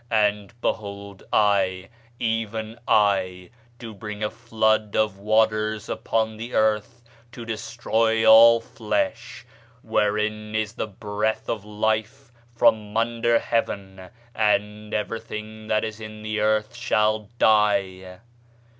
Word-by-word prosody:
And, 105 +1 0
behold, 100 -2 -4
I, 95 -3 +2 0.3
even 110 0 -3
I, 95 -3 +1 0.3
do 115 -2 -9
bring 105 0 -7
a 105 - -1
flood 110 -2 0
of 105 -3 0
waters 110 0 +1
upon 110 -1 -1
the 115 +2 -6
earth, 110 +2 0 0.3
to 120 -1 -8
destroy 115 0 0
all 115 +1 +8
flesh, 105 -3 -3 0.4
wherein 105 +1 -1
is 110 -1 -1
the 110 - -4
breath 105 +1 -3
of 105 -3 -3
life, 110 +5 -2 0.2
from 110 -2 +2
under 115 0 +2
heaven; 95 -6 -3 0.2
and 105 -1 0
everything 110 0 -5
that 110 -1 +1
is 110 -1 -5
in 110 0 -9
the 110 0 -2
earth 105 0 +1
shall 105 -1 0
die. 95 -4 +1
110 Hz, 115 wpm, -24 LUFS, 105-110 Hz, 0.4 s, all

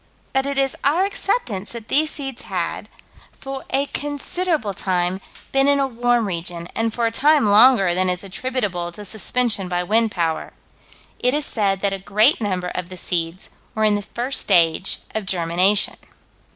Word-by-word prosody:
But 270 +1 +1
it 280 -1 -2
is 270 -1 +2
our 325 +7 +3
acceptance 250 - -2
that 230 -2 -8
these 310 +2 +3
seeds 270 -4 -6
had, - - -4 0.5
for 270 -1 -7
a 275 +1 +1
considerable 290 - -2
time, 185 0 -1 0.3
been 270 0 +3
in 285 0 +4
a 275 - +2
warm 245 -2 +1
region, 170 -2 -4
and 225 0 0
for 235 +1 -1
a 230 - +1
time 290 +3 +3
longer 210 -3 +6
than 185 +1 +2
is 180 +1 -1
attributable 195 -4 -3
to 210 +3 -9
suspension 220 -1 0
by 180 0 -1
wind 220 +4 +2
power: 165 -5 -2 0.7
"It 250 +3 +2
is 300 -1 -1
said 195 -3 0
that 200 -1 +1
a 195 - -4
great 215 +8 +3
number 185 -4 -1
of 180 -1 -5
the 185 - -9
seeds 170 0 -3 0.2
were 220 - 0
in 215 -1 +4
the 205 - 0
first 240 +6 -3
stage 170 -1 +2
of 220 -3 -3
germination." 180 +3 +2
215 Hz, 175 wpm, -21 LUFS, 185-265 Hz, 0.7 s, longer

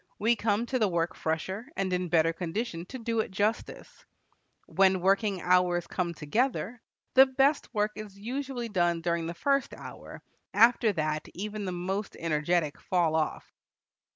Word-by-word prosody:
We 230 +3 +3
come 220 +1 0
to 255 +1 -1
the 215 - +3
work 170 -1 0
fresher, 190 +8 -3
and 190 -1 0
in 180 -1 -1
better 165 0 +3
condition 175 +1 -4
to 260 - -7
do 230 -1 -2
it 220 - 0
justice. 205 +4 -3 0.6
When 190 -1 +3
working 195 0 +1
hours 180 -1 +3
come 175 -2 -3
together, 230 - -1 0.3
the 265 +1 +8
best 270 +3 +2
work 210 -2 0
is 210 -2 -9
usually 250 +3 -4
done 175 -5 +1
during 170 -1 -1
the 170 - -5
first 275 +8 0
hour; - - -10 0.3
after 230 0 +5
that 155 -2 -2
even 210 +2 -4
the 185 - -2
most 190 +3 -3
energetic 155 -1 0
fall 175 -4 +1
off. 160 -1 -2
190 Hz, 155 wpm, -29 LUFS, 170-225 Hz, 0.6 s, the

